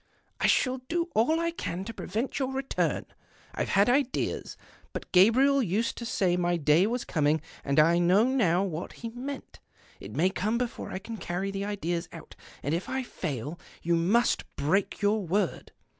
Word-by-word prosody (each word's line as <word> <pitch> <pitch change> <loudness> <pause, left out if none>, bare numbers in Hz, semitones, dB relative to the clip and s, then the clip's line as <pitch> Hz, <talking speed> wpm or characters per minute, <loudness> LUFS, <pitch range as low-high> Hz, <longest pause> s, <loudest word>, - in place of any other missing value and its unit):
" - - -42
I - - +4
shall 255 0 +2
do 340 0 -1
all 285 +9 +3
I 335 0 0
can 190 - -4
to 230 - -6
prevent 225 +7 -3
your 265 -1 -1
return; 270 0 -1 0.5
I've - - -2
had 200 +1 +4
ideas. 265 +1 0 0.4
But - - -6
Gabriel 255 +9 +5
used 215 +2 0
to 235 - -5
say 185 -5 +1
my 175 0 +1
day 155 +5 +4
was 240 +2 -2
coming, 155 0 +2 0.2
and 140 +1 +2
I 170 +3 +5
know 180 +5 +5
now 210 -9 +2
what 175 -3 -4
he 230 - -6
meant. 260 +4 -7 0.4
It - - -9
may 185 +4 +3
come 210 +4 0
before 240 -1 -3
I - - -3
can 225 +4 -7
carry 190 +1 -3
the 195 0 -3
ideas 175 -4 -2
out, - - -11 0.3
and 145 - -1
if 170 +2 -2
I 265 0 -1
fail 145 - -5 0.2
you 170 - +1
onu.sf 190 +9 +3
break 190 +8 0
your 210 +1 +3
word. 190 +4 -1
200 Hz, 185 wpm, -28 LUFS, 175-245 Hz, 0.5 s, Gabriel